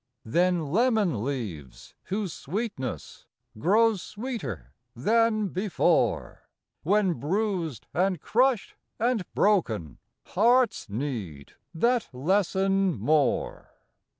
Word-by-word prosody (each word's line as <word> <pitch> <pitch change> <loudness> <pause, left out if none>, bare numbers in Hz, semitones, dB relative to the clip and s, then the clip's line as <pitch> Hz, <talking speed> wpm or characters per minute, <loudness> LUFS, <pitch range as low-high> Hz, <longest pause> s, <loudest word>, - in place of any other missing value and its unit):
Then 175 +6 +1
lemon 210 - +2
leaves, 105 - -6
whose 195 -2 -3
sweetness 150 - -5 0.3
Grows 215 - +3
sweeter 200 - -6 0.2
than 215 - +2
before 190 +1 0 0.3
When 195 +2 +2
bruised, 170 - -2
and 185 0 +1
crushed, 250 - +1 0.3
and 235 -2 +1
broken, 110 - +1 0.3
—Hearts 240 - +2
need 100 - -5 0.2
that 240 +7 +1
lesson 190 +4 +1
more. 150 -3 0
185 Hz, 85 wpm, -27 LUFS, 135-215 Hz, 0.3 s, Grows